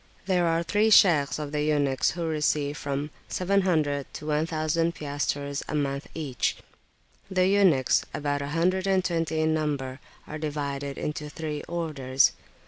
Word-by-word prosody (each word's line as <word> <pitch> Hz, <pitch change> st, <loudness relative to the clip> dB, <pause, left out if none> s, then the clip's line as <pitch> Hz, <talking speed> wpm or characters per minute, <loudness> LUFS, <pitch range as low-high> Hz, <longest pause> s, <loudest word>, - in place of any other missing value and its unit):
There 180 Hz, -3 st, +2 dB
are 165 Hz, +1 st, +1 dB
three 205 Hz, +6 st, +2 dB
Shaykhs 165 Hz, -9 st, +5 dB
of 150 Hz, -1 st, -5 dB
the 150 Hz, 0 st, -1 dB
eunuchs 145 Hz, -3 st, +2 dB
who 170 Hz, -, -2 dB
receive 150 Hz, -2 st, 0 dB
from 145 Hz, +1 st, -3 dB, 0.2 s
700 175 Hz, -7 st, +1 dB
to -, -, -7 dB
1000 155 Hz, +2 st, 0 dB
piastres 145 Hz, -1 st, -2 dB
a -, -, -2 dB
month 140 Hz, -1 st, -1 dB
each. 145 Hz, -6 st, -1 dB, 0.7 s
The 185 Hz, -1 st, +2 dB
eunuchs, 190 Hz, -10 st, +4 dB
about 145 Hz, -1 st, -2 dB
a 140 Hz, -, -3 dB
hundred 180 Hz, +5 st, +1 dB
and 190 Hz, -1 st, +2 dB
twenty 165 Hz, -3 st, 0 dB
in 155 Hz, 0 st, +2 dB
number, 140 Hz, -4 st, -2 dB, 0.3 s
are 155 Hz, -, -7 dB
divided 140 Hz, -2 st, -3 dB
into 150 Hz, 0 st, -4 dB
three 150 Hz, -1 st, -4 dB
orders. 140 Hz, -6 st, +1 dB
150 Hz, 145 wpm, -27 LUFS, 145-165 Hz, 0.7 s, Shaykhs